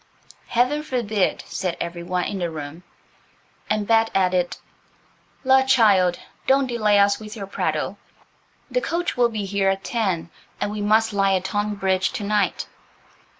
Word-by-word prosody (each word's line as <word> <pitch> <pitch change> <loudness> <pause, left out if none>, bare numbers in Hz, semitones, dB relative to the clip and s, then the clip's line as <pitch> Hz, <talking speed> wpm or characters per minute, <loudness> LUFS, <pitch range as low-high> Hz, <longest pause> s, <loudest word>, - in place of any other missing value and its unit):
"Heaven 250 +5 +1
forbid," 225 -9 -1
said 180 -3 -3
every 170 0 -4
one 180 +1 -1
in 195 - -3
the 175 -1 -1
room; 155 +1 -7 0.9
and 210 -1 0
Bet 225 +1 +3
added, 180 -2 +1 0.9
"La, 265 0 +5
child, 210 -9 +4 0.3
don't 270 +1 +4
delay 215 -4 +2
us 200 0 +4
with 215 -1 -9
your 200 -3 -5
prattle. 195 - -2 0.7
The - - +1
coach 345 -3 -2
will 245 -2 +3
be 215 -3 -3
here 195 0 +1
at 195 0 -1
ten, 190 -8 -2 0.3
and 205 - -1
we 210 0 -4
must 220 +1 +2
lie 195 -1 +3
at 185 0 -2
Tonbridge 195 -2 0
to 210 - -4
night." 210 0 0
205 Hz, 150 wpm, -23 LUFS, 185-225 Hz, 0.9 s, La